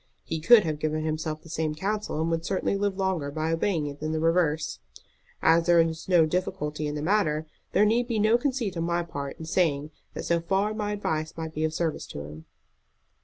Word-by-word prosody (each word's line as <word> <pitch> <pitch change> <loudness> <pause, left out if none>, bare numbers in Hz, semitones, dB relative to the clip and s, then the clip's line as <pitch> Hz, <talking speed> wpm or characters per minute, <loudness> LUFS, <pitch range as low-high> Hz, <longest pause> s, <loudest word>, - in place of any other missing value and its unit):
He 160 - -3
could 225 +6 +7
have 155 -3 -2
given 155 0 -1
himself 155 0 -3
the 165 - -13
same 155 -2 -1
counsel, 200 0 -2
and 160 +1 0
would 165 0 -1
certainly 190 +3 0
live 200 -1 -1
longer 190 -7 0
by 155 +2 -2
obeying 165 -2 0
it 145 0 -6
than 155 +1 -2
the 160 - 0
reverse. 160 -2 +1 0.6
As 165 +1 +4
there 175 -1 +6
is 165 +1 0
no 175 -3 +6
difficulty 155 -3 -2
in 150 - -3
the 150 - -3
matter, 160 -5 +1 0.3
there 210 - +5
need 235 +3 +2
be 230 -3 -1
no 215 +2 +4
conceit 245 -6 -1
on 165 - -1
my 170 0 0
part 140 -4 -6
in 160 - -7
saying 155 -4 +1 0.2
that - - -5
so 170 0 +2
far 195 +5 0
my 210 -1 -2
advice 160 -6 -2
might 160 -1 -5
be 155 - -2
of 160 0 0
service 165 -2 -2
to 75 - -7
him." 75 +2 -10
165 Hz, 220 wpm, -27 LUFS, 155-190 Hz, 0.6 s, could